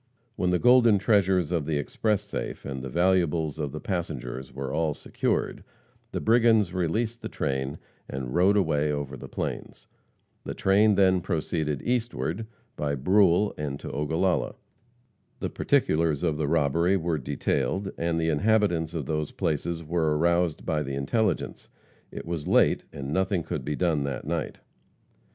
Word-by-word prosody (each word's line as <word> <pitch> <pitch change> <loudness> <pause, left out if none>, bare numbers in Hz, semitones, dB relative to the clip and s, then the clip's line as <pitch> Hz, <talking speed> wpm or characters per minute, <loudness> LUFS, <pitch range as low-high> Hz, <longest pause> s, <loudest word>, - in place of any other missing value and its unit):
When 90 - 0
the 90 - +3
golden 120 -1 +6
treasures 95 -5 +2
of 80 -5 -1
the 80 -2 0
express 105 +8 0
safe, 105 - -5
and 65 -1 -4
the 65 - -5
valuables 85 -2 +1
of 75 -2 -2
the 75 - -6
passengers 65 -9 -4
were 65 +1 -5
all 80 -1 0
secured, - - -2 0.5
the - - -2
brigands 110 -5 +4
released 110 +7 -1
the - - -5
train 65 +1 -2 0.3
and 65 -1 -5
rode 95 +4 +4
away 75 -5 +1
over 70 -2 -3
the - - -9
plains. - - -5 0.6
The - - -5
train 100 +2 +4
then 95 -2 +4
proceeded 80 -4 -2
eastward, 115 -4 -2 0.3
by 70 -1 -1
Brule 95 +6 +3
and 70 -2 -3
to - - -7
Ogallala. 80 +5 0 0.8
The - - -3
particulars 80 -1 +1
of 80 -3 +1
the 75 -2 -1
robbery 85 +5 +2
were 85 -3 -1
detailed, 80 +8 -1
and 85 0 -1
the 80 0 +1
inhabitants 85 -2 +1
of 75 -4 -3
those 75 +1 -2
places 80 +2 -2
were 80 -1 0
aroused 85 0 +1
by 75 -1 0
the 70 -2 -4
intelligence. 105 - -1 0.4
It - - -8
was 85 -3 -4
late - - +3
and 70 0 -5
nothing 95 -1 +1
could - - -4
be 75 - -2
done 85 -4 +1
that 70 - -4
night. 80 +1 -3
85 Hz, 155 wpm, -27 LUFS, 75-95 Hz, 0.8 s, golden